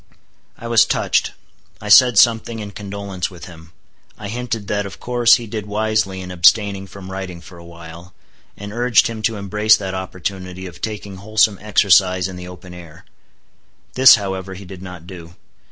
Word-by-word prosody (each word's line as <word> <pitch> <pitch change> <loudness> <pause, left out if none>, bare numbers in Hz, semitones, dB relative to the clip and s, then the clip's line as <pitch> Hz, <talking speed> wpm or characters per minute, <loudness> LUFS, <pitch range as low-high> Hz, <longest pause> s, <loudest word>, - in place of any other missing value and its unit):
I 115 - -8
was 115 -1 +5
touched. - - 0 0.5
I 105 - -8
said 120 +2 +7
something 115 +1 +3
in 105 -2 -7
condolence 100 -3 -6
with 90 -3 -12
him. 80 -2 -14 0.5
I 105 -2 -7
hinted 115 -2 -4
that 105 0 -2
of 95 0 -12
course 120 -1 +4
he 120 - -5
did 105 -1 -6
wisely 105 -2 -1
in 90 0 -8
abstaining 100 +2 +2
from 95 0 -11
writing 95 -2 -6
for 85 +1 -14
a - - -13
while; 85 +1 -13 0.4
and 100 +1 -8
urged 120 -2 +3
him 115 -1 -4
to 110 0 -1
embrace 105 +2 +2
that 95 -2 -5
opportunity 95 0 -6
of 85 -5 -11
taking 105 -3 -6
wholesome 105 0 +1
exercise 95 -3 +3
in 95 - -9
the 90 0 -9
open 90 0 -12
air. 85 -2 -13 0.9
This, 130 0 +8
however, 95 -2 -5
he 95 +1 -11
did 95 0 -11
not 90 -3 -10
do. 85 -2 -12
95 Hz, 175 wpm, -19 LUFS, 90-105 Hz, 0.9 s, This